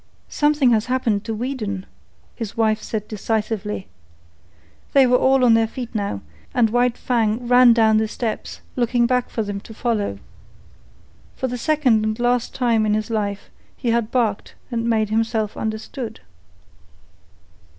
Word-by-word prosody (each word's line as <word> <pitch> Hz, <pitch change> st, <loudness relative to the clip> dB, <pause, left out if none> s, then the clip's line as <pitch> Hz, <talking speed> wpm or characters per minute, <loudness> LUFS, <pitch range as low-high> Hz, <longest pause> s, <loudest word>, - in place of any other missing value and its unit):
"Something 295 Hz, -4 st, +3 dB
has 220 Hz, 0 st, +2 dB
happened 235 Hz, -5 st, 0 dB
to 225 Hz, -, -3 dB
Weedon," 215 Hz, -5 st, -3 dB, 0.5 s
his 225 Hz, -3 st, -6 dB
wife 220 Hz, -1 st, +2 dB
said 215 Hz, -2 st, -4 dB
decisively. 215 Hz, -1 st, -2 dB, 1.1 s
They 275 Hz, -1 st, +6 dB
were 250 Hz, 0 st, +4 dB
all 265 Hz, -1 st, +4 dB
on 235 Hz, -, +6 dB
their 225 Hz, 0 st, +3 dB
feet 245 Hz, +1 st, -7 dB
now, 200 Hz, -, -2 dB, 0.3 s
and 225 Hz, -3 st, +3 dB
White 245 Hz, 0 st, +2 dB
Fang 235 Hz, -1 st, 0 dB
ran 245 Hz, 0 st, +7 dB
down 220 Hz, -2 st, +4 dB
the 220 Hz, 0 st, +1 dB
steps, 225 Hz, 0 st, -4 dB
looking 240 Hz, -1 st, +2 dB
back 250 Hz, 0 st, +1 dB
for 225 Hz, -, -2 dB
them 205 Hz, -1 st, -4 dB
to 220 Hz, +2 st, -12 dB
follow. 215 Hz, -, -1 dB, 1.2 s
For 260 Hz, -, -2 dB
the 250 Hz, -, -4 dB
second 250 Hz, -4 st, +2 dB
and 215 Hz, +1 st, -2 dB
last 245 Hz, 0 st, 0 dB
time 235 Hz, -4 st, +2 dB
in 210 Hz, -, +2 dB
his 215 Hz, +1 st, -3 dB
life 205 Hz, -2 st, -3 dB, 0.3 s
he 240 Hz, -3 st, -1 dB
had 230 Hz, -2 st, +1 dB
barked 230 Hz, -6 st, -1 dB, 0.2 s
and 235 Hz, 0 st, -1 dB
made 220 Hz, -2 st, +1 dB
himself 220 Hz, -1 st, 0 dB
understood. 220 Hz, +1 st, -5 dB
225 Hz, 150 wpm, -21 LUFS, 215-245 Hz, 1.2 s, ran